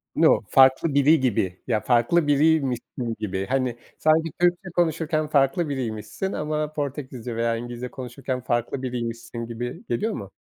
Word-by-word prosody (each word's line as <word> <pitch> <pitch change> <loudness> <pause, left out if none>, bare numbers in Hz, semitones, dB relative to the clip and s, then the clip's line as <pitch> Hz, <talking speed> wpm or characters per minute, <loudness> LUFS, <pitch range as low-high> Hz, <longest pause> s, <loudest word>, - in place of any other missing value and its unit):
No, - - +5
farklı 135 +3 +5
biri 145 +3 +5
gibi, 100 -8 0
ya 110 - +1
farklı 130 +7 +2
biriymişsin 135 -6 +1
gibi. 95 -2 -2
Hani, 130 -2 0 0.2
sanki 160 0 +2
Türkçe 175 +2 +2
konuşurken 160 -2 +1
farklı 150 +3 +2
biriymişsin 130 - -3
ama 150 0 -2
Portekizce 130 -5 -4
veya 115 0 +1
İngilizce 120 +1 -6
konuşurken 130 0 -5
farklı 120 +2 -1
biriymişsin 115 -2 -4
gibi 120 +1 -6
geliyor 215 - 0
mu? 100 - -7
130 Hz, 140 wpm, -24 LUFS, 120-155 Hz, 0.2 s, No